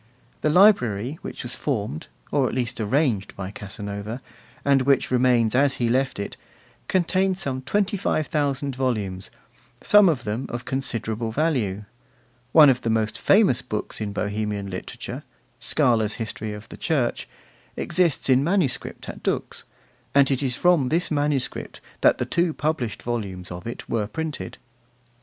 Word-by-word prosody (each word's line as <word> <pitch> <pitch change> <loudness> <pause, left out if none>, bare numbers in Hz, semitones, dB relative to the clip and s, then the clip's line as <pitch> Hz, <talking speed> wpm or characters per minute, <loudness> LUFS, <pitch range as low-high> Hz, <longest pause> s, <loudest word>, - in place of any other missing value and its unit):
The 155 - +2
library, 150 - +4
which - - -7
was 120 - -2
formed, 105 - -3 0.2
or 135 -3 +2
at - - -5
least 120 -2 -1
arranged, 110 -3 0
by 95 -1 -5
Casanova, 105 +2 -6 0.5
and 140 -1 +4
which 135 0 +2
remains 125 -3 +3
as 135 +1 +3
he 120 -2 0
left 130 +2 +1
it, 100 - -5 0.5
contains 185 +1 +1
some 135 -7 -3
25,000 150 - 0
volumes, 105 -8 -2 0.5
some 210 -3 +7
of 135 -7 -1
them 110 +4 -3
of 120 +1 -5
considerable 115 -4 -2
value; 110 -9 0 0.7
one 155 -2 +8
of 125 - -2
the 115 - -1
most 110 -1 0
famous 195 - +4
books 110 -2 -4
in 105 -1 -2
Bohemian 105 -1 -2
literature, 90 - -6 0.4
Skala's 115 -7 +2
History 110 -1 -4
of 105 +1 -8
the - - -10
Church, 140 -8 -1 0.5
exists 175 -5 +1
in 130 0 +4
manuscript 170 -5 -1
at - - -7
Dux, - - -2 0.5
and 140 -1 +5
it 135 0 +1
is 130 -3 +1
from 170 -6 +3
this 170 +3 0
manuscript 145 -3 -1 0.2
that - - +5
the - - -1
two 170 -2 0
published 135 -7 -2
volumes 100 -7 -4
of 90 +4 -7
it 120 - -6
were 110 -3 -1
printed. 155 +7 -5
125 Hz, 145 wpm, -24 LUFS, 110-150 Hz, 0.7 s, one